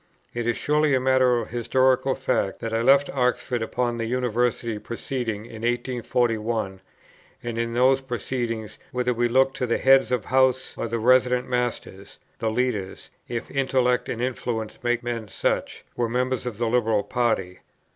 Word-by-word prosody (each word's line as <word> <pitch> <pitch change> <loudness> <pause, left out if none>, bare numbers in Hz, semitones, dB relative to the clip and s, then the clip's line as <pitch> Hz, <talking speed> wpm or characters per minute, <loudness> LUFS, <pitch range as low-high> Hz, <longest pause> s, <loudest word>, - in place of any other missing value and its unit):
It 120 -1 -3
is 120 - +1
surely 150 -1 +2
a - - +2
matter 130 -1 +3
of 115 - -3
historical 130 +2 +2
fact 100 -6 -1
that 115 -1 -4
I 115 - +1
left 140 +3 +5
Oxford 125 -2 0
upon 120 +1 -1
the 115 - -2
University 120 -2 0
proceedings 115 -2 -4
of - - -13
1841; 115 -4 -1 0.6
and 120 -1 -4
in 115 0 -2
those 130 +2 +4
proceedings, 120 -3 -4
whether 125 -1 0
we 120 +1 +1
look 130 +2 +3
to 125 - -2
the 115 - +1
Heads 135 -1 +4
of 120 -5 0
Houses 130 0 +2
or - - -3
the 115 +1 -2
resident 125 +1 +3
Masters, 120 -5 -3 0.2
the 110 - 0
leaders, 110 -5 -2 0.2
if 120 -1 -5
intellect 130 -2 +1
and 120 +1 -2
influence 120 -3 -3
make 120 0 0
men 120 -2 -3
such, - - -2
were 120 -1 0
members 125 +1 -1
of 115 -4 -5
the 120 0 0
Liberal 115 -3 +2
party. 110 -7 -1
120 Hz, 165 wpm, -24 LUFS, 115-125 Hz, 0.6 s, left